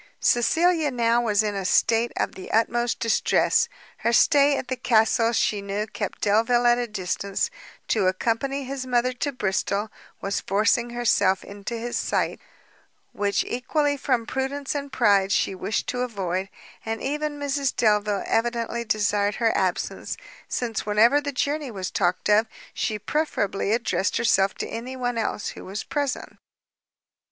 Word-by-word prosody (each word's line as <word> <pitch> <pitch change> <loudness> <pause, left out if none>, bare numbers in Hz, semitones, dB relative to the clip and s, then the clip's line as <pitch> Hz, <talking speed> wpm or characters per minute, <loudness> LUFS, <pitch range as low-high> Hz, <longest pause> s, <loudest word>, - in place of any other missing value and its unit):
Cecilia 320 +6 +3
now 235 -2 +2
was 215 -3 +2
in 210 -1 -1
a 195 -1 -3
state 225 +5 +2
of - - -1
the 190 - -9
utmost 235 +2 +1
distress; 230 -1 +2 0.3
her 235 - 0
stay 285 +3 +5
at - - -4
the 260 - -2
castle 230 -1 +3
she 210 -3 +1
knew 200 +1 -2
kept 215 - -5
Delvile 230 +4 +3
at 240 0 +5
a 240 - -1
distance; 195 -1 -2 0.4
to 205 -4 +2
accompany 235 +8 -1
his 265 0 -5
mother 250 0 +1
to 285 +3 -2
Bristol, 205 -2 -1 0.3
was 195 +1 -2
forcing 220 +4 +1
herself 210 -5 +2
into 205 +4 -6
his 240 +1 -3
sight, - - -1 0.7
which 200 -1 0
equally 285 +4 0
from 240 -4 0
prudence 270 +3 -2
and 285 -1 -4
pride 205 -6 +3
she 195 - +1
wished 200 +3 -2
to 250 - -2
avoid; 190 -5 -2 0.3
and 225 0 -3
even 295 +1 -2
Mrs 280 -1 -1
Delvile 210 -2 +2
evidently 235 0 -1
desired 205 -1 +1
her 230 -2 +1
absence, - - -1 0.3
since 235 -3 -2
whenever 225 +7 +4
the 285 -1 -3
journey 285 +1 -1
was 190 -5 -5
talked 180 -1 0
of, 215 +2 +4 0.3
she 215 - -1
preferably 210 -6 -1
addressed 225 -3 0
herself 200 -4 +2
to - - -4
any 245 +3 -6
one 245 -2 -2
else 215 - -2
who - - -9
was 195 +3 -5
present. 285 -2 -3
230 Hz, 155 wpm, -24 LUFS, 205-255 Hz, 0.7 s, stay